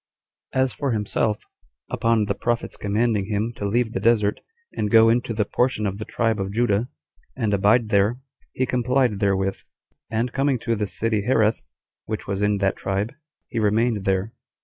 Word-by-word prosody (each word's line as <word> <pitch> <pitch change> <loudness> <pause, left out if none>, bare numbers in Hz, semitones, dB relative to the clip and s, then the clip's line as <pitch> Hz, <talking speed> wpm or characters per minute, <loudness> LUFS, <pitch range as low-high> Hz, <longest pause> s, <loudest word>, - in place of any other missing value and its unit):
4. 130 - +2
As 130 - -1
for 140 -4 -1
himself, 105 0 -1 0.5
upon 115 -2 +2
the 100 - 0
prophet's 120 +4 -2
commanding 105 0 0
him 110 +2 -1
to 100 - -3
leave 115 +2 0
the - - -1
desert, 110 -3 +2 0.3
and 105 - -1
to - - -10
go 115 0 +7
into 120 +1 +1
the 105 -2 0
portion 125 -1 0
of 100 0 -2
the 110 - -5
tribe 115 -3 0
of 95 0 -2
Judah, 115 +1 +1 0.5
and 110 -5 0
abide 105 +3 +3
there, 105 +4 +2 0.3
he 130 - 0
complied 125 -3 +1
therewith; 95 -1 +1 0.5
and 115 +2 -1
coming 135 -1 +1
to 115 0 -1
the 105 -1 -2
city 105 +3 -1
Hareth, 110 -1 +2 0.4
which 110 0 -4
was 100 0 -3
in 105 0 +2
that 100 -1 0
tribe, 100 +3 -2 0.3
he 115 - -3
remained 110 0 +1
there. 95 +3 0
110 Hz, 180 wpm, -23 LUFS, 100-120 Hz, 0.5 s, go